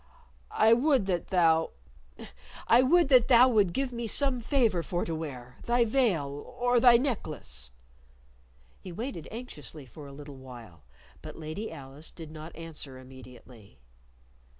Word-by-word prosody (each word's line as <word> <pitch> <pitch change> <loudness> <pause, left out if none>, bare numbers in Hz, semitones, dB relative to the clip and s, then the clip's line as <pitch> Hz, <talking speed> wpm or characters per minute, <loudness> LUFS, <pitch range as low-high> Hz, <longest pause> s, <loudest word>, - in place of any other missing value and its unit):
"I 220 +1 +5
would 260 -2 +2
that 180 -3 -2
thou 165 -3 +2 0.9
I 235 - +6
would 310 +4 +4
that 250 -4 +5
thou 250 0 +7
would 205 -7 +3
give 265 +7 -2
me 235 -1 -4
some 265 +1 +2
favor 230 -8 +1
for 175 +1 -3
to 165 - -4
wear 130 -6 -7
thy 240 0 +2
veil 220 - +1 0.3
or 245 0 +3
thy 235 0 +7
necklace." 150 - -4 1.1
He 185 - -10
waited 185 - -6
anxiously 155 - -9
for 140 +4 -12
a - - -11
little 145 0 -11
while, 120 -9 -13 0.4
but - - -10
Lady 160 +8 -6
Alice 140 0 -6
did 160 -3 -11
not 155 +1 -10
answer 155 -5 -8
immediately. 125 - -15
170 Hz, 145 wpm, -28 LUFS, -, 1.1 s, thou